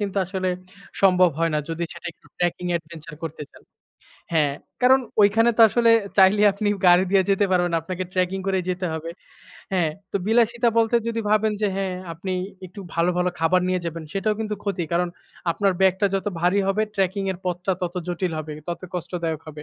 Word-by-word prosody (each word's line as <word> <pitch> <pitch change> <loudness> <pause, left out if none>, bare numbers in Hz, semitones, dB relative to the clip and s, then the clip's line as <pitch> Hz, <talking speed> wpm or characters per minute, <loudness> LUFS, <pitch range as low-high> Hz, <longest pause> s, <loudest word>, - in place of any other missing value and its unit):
কিন্তু 200 -1 -3
আসলে 185 0 -2 0.5
সম্ভব 185 -2 +5
হয় 165 0 +1
না। - - +2
যদি 165 +1 -2
সেটা - - -10
একটু - - -26
ট্র্যাকিং 175 0 -1
অ্যাডভেঞ্চার 165 -2 -6
করতে 160 -2 -5
চান। - - -18 0.7
হ্যাঁ, 150 -3 +2 0.3
কারণ 260 +1 +6 0.2
ঐখানে 225 +3 +4
তো - - +2
আসলে 235 +1 +3 0.3
চাইলে 195 +2 +6
আপনি 205 +1 -2 0.2
গাড়ি 180 +1 +6
দিয়ে 195 -1 +4
যেতে 195 +1 +3
পারবেন 175 -1 +2
না, 165 - +3
আপনাকে 185 +2 -4
ট্র্যাকিং 185 +1 0
করেই 190 -2 0
যেতে 180 0 -2
হবে। 160 +1 -5 0.6
হ্যাঁ, 175 -5 +2 0.2
তো - - +1
বিলাসিতা 235 +1 +3
বলতে 230 +1 +3
যদি 230 0 -2
ভাবেন 215 0 +3
যে - - +4
হ্যাঁ, 190 -2 -2 0.2
আপনি 185 +3 -5 0.3
একটু 185 +3 -11
ভালো, 170 +1 +2
ভালো 180 0 +1
খাবার 170 +3 +3
নিয়ে 185 0 0
যাবেন 165 0 -4
সেটাও 210 +2 0
কিন্তু 215 -1 -2
ক্ষতি 190 -4 -1
কারণ 175 +1 +1 0.4
আপনার 195 +3 +1
ব্যাগটা 190 +1 +3
যত 195 +1 -2
ভারী 180 +3 +3
হবে 210 +2 +1
ট্র্যাকিং 195 +1 0
এর 175 - -10
পথটা 180 +1 -1
তত 175 0 -2
জটিল 175 0 -2
হবে, 155 0 -5 0.2
তত 170 -1 -3
কষ্টদায়ক 170 -2 -3
হবে। 150 -1 -9
185 Hz, 190 wpm, -23 LUFS, 170-200 Hz, 0.7 s, কারণ